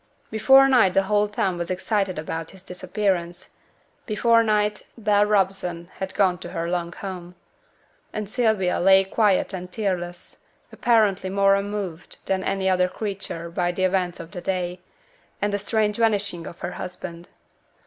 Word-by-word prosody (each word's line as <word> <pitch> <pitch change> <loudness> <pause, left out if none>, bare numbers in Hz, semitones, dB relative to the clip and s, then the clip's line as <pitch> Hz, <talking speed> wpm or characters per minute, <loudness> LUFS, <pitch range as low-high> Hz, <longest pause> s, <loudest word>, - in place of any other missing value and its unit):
Before 265 +5 +6
night 240 -9 +4
the 195 - +4
whole 210 +1 +2
town 190 -3 -1
was 170 - -3
excited 190 0 -1
about 160 +1 -4
his 190 -1 -14
disappearance. 180 -1 -2 0.6
Before 230 +1 +4
night 210 -1 +1 0.2
Bell 210 -2 +3
Robson 185 -4 0
had 190 0 -4
gone 185 -3 +2
to - - -8
her 165 0 -3
long 170 -1 -2
home. 180 -1 -7 0.8
And 215 -1 -4
Sylvia 215 -5 +1
still - - -2
lay 190 +1 +6
quiet 195 0 +1
and 180 -1 -6
tearless, 180 -4 -4 0.3
apparently 210 -5 +2
more 195 +1 +4
unmoved 200 -4 -3
than 190 -1 0
any 195 0 -1
other 180 -1 +3
creature 190 -4 -5
by 175 0 0
the 185 +1 -2
events 185 -2 0
of 165 - -9
the 180 -3 -7
day, 180 -1 -2 0.6
and 205 0 -1
the 205 - 0
strange 210 0 0
vanishing 205 -6 0
of 170 - -11
her - - -3
husband. 175 -1 -8
190 Hz, 160 wpm, -24 LUFS, 180-210 Hz, 0.8 s, Before